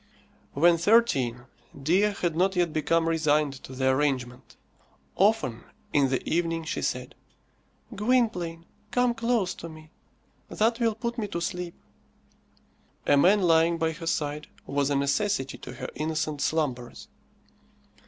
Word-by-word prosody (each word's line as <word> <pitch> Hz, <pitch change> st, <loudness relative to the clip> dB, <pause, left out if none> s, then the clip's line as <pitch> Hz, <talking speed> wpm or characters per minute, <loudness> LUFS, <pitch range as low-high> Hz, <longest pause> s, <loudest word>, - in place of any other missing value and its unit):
When 170 Hz, +3 st, +4 dB
thirteen, 150 Hz, -, +2 dB, 0.3 s
Dea 185 Hz, +9 st, +2 dB
had 170 Hz, -3 st, 0 dB
not 190 Hz, +3 st, +2 dB
yet 175 Hz, -3 st, +1 dB
become 165 Hz, +2 st, +1 dB
resigned 155 Hz, -3 st, +2 dB
to 130 Hz, -, -9 dB
the 130 Hz, 0 st, +1 dB
arrangement. 130 Hz, -3 st, -2 dB, 0.6 s
Often 190 Hz, -, +2 dB, 0.3 s
in 140 Hz, -2 st, +3 dB
the 130 Hz, -, -2 dB
evening 165 Hz, 0 st, 0 dB
she 160 Hz, -, -3 dB
said, -, -, -3 dB, 0.8 s
"Gwynplaine, 200 Hz, -7 st, 0 dB, 0.2 s
come 245 Hz, -1 st, +2 dB
close 230 Hz, -5 st, 0 dB
to 170 Hz, -, -9 dB
me; 155 Hz, 0 st, -13 dB, 0.6 s
that 230 Hz, +2 st, +1 dB
will 230 Hz, -2 st, +1 dB
put 235 Hz, +1 st, -4 dB
me 210 Hz, -, -2 dB
to 185 Hz, -4 st, -4 dB
sleep." 175 Hz, 0 st, -4 dB, 1.3 s
A 145 Hz, -, +4 dB
man 190 Hz, +8 st, +4 dB
lying 165 Hz, 0 st, +4 dB
by 160 Hz, 0 st, 0 dB
her 165 Hz, +1 st, -8 dB
side 150 Hz, -2 st, -2 dB, 0.2 s
was 140 Hz, 0 st, 0 dB
a 145 Hz, -, +1 dB
necessity 140 Hz, 0 st, 0 dB
to -, -, -9 dB
her 130 Hz, -, -6 dB
innocent 155 Hz, -1 st, -2 dB
slumbers. 130 Hz, -7 st, -2 dB
165 Hz, 135 wpm, -27 LUFS, 145-195 Hz, 1.3 s, When